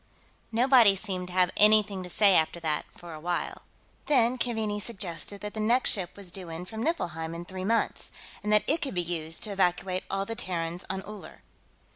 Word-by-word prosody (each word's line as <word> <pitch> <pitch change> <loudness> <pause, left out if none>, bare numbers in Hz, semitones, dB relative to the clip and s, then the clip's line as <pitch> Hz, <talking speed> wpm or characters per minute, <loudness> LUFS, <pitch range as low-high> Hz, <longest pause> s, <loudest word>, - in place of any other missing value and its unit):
Nobody 235 -3 +6
seemed 185 -2 -2
to 180 - -9
have 180 -1 +3
anything 210 -2 +4
to 180 - -7
say 200 +1 +6
after 160 +2 +2
that, 155 -2 -1
for 170 -1 -11
a 155 - -8
while. 175 +2 -3 0.5
Then 255 -3 +3
Keaveney 220 -3 -1
suggested 195 -3 -6
that 210 0 -5
the 220 - -5
next 235 +4 +3
ship 185 -4 -3
was 195 -3 -8
due 185 -2 -8
in 165 +2 -6
from 220 +3 -6
Niflheim 165 - -2
in 170 +1 -6
three 185 0 -6
months, 230 +2 0 0.3
and 210 - -2
that 210 0 +5
it 320 +4 +1
could 270 - -3
be 175 - +2
used 165 -1 -3
to 215 - -3
evacuate 185 -1 0
all 195 0 -1
the 225 - -4
Terrans 175 -3 -2
on 190 0 -3
Uller. 210 0 -10
195 Hz, 200 wpm, -28 LUFS, 175-215 Hz, 0.5 s, Nobody